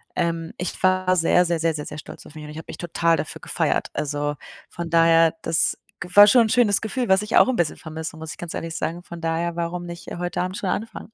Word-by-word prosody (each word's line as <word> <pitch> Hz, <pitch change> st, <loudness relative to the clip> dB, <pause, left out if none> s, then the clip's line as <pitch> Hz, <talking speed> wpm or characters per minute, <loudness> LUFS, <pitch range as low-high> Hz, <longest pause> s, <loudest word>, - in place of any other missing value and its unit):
ähm, 165 Hz, -2 st, -2 dB
ich 180 Hz, +1 st, -5 dB
war 185 Hz, 0 st, +3 dB
sehr, 180 Hz, +1 st, +4 dB
sehr, 170 Hz, -1 st, 0 dB
sehr, 165 Hz, 0 st, +1 dB
sehr, 150 Hz, -1 st, -5 dB
sehr 150 Hz, -, -8 dB
stolz -, -, -10 dB
auf 150 Hz, -, -16 dB
mich 155 Hz, -, -8 dB
und 150 Hz, -, -8 dB
ich 155 Hz, -, -9 dB
habe 160 Hz, -, -8 dB
mich -, -, -8 dB
total 170 Hz, -1 st, +1 dB
dafür -, -, -5 dB
gefeiert. -, -, -1 dB
Also, 145 Hz, 0 st, -2 dB, 0.3 s
von 170 Hz, -1 st, -6 dB
daher, 165 Hz, 0 st, +5 dB
das 165 Hz, -1 st, 0 dB, 0.2 s
g 175 Hz, -, -6 dB
war 205 Hz, 0 st, +10 dB
schon 240 Hz, +3 st, +6 dB
'n -, -, -2 dB
schönes 225 Hz, -5 st, +3 dB
Gefühl, 240 Hz, +3 st, -2 dB
was 190 Hz, +2 st, +4 dB
ich 210 Hz, -, -2 dB
auch -, -, +7 dB
'n 260 Hz, -, +1 dB
bisschen 170 Hz, -8 st, 0 dB
vermisse, 160 Hz, 0 st, -7 dB
muss 160 Hz, 0 st, -8 dB
ich -, -, -9 dB
ganz 175 Hz, -2 st, -7 dB
ehrlich 165 Hz, 0 st, -5 dB
sagen, 170 Hz, +2 st, -3 dB
von 170 Hz, -1 st, -10 dB
daher, 165 Hz, +1 st, -1 dB
warum 175 Hz, +1 st, -3 dB
nicht 170 Hz, 0 st, -8 dB
heute 175 Hz, 0 st, -3 dB
Abend 185 Hz, +1 st, -4 dB
schon 190 Hz, -, -3 dB
anfangen? 225 Hz, +1 st, -4 dB
170 Hz, 255 wpm, -23 LUFS, 160-185 Hz, 0.3 s, war